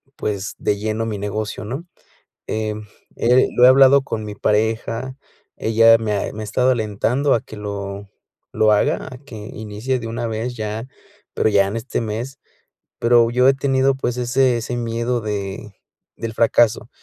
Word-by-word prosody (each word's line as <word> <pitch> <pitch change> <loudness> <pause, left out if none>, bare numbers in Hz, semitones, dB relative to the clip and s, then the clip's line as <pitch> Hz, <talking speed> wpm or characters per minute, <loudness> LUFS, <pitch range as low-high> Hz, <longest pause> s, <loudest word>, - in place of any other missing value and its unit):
pues, 105 -1 -3
de 105 - 0
lleno 110 +2 -2
mi 110 -3 -4
negocio, 105 +1 -4
¿no?, 135 +10 -5 0.6
em, 110 -1 -3 0.3
eh, 125 +2 +4
lo 125 - +6
he - - +10
hablado 135 +1 +7
con 115 -5 -4
mi 105 -1 -6
pareja, 115 +5 -1 0.4
ella 115 +1 +5
me 110 -2 -2
ha 100 - -2
me 110 - -6
ha - - -4
estado 125 +5 +1
alentando 120 +4 +1
a 115 - +1
que 110 - -12
lo 100 -1 -6 0.4
lo 110 0 +3
haga, 105 - +1
a 125 - -9
que 135 -4 -12
inicie 110 +4 -4
de 115 - -6
una 115 +1 -3
vez 115 +2 -3
ya, 110 +2 -4 0.5
pero - - +2
ya 100 -2 +4
en 105 - -4
este 115 +3 -3
mes, 115 +5 -4 0.6
pero 115 -1 +4
yo 125 +2 +4
he 135 - +5
tenido, 135 0 +2
pues, 125 -2 -2
ese 125 0 +2
ese 120 +2 -4
miedo 120 +1 -1
de, 105 0 -5 0.4
del 115 -1 -5
fracaso, 115 0 +2
115 Hz, 175 wpm, -20 LUFS, 105-125 Hz, 0.6 s, he